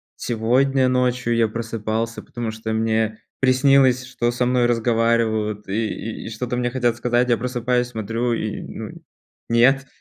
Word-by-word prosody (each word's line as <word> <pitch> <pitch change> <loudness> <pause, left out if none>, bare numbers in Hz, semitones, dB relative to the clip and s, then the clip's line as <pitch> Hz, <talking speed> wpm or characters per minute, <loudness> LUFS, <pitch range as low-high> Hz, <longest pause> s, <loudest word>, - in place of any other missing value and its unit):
Сегодня 130 +3 +1
ночью 125 -2 +1
я 115 -2 +2
просыпался, 115 0 -3
потому 120 -2 -5
что 110 0 -5
мне 110 0 0 0.2
приснилось, 130 -1 +4
что 120 -2 -1
со 125 +1 0
мной 125 -1 +2
разговаривают 115 -3 +1
и 110 +2 -3
и - - -4
что-то 125 +2 -4
мне 120 0 0
хотят 120 -3 +1
сказать. 120 +1 +1
Я 120 - +3
просыпаюсь, 125 0 -1
смотрю- 115 +1 -2
и, 110 -2 -3
ну, - - -7 0.6
нет. 135 +4 +4
120 Hz, 145 wpm, -22 LUFS, 110-125 Hz, 0.6 s, приснилось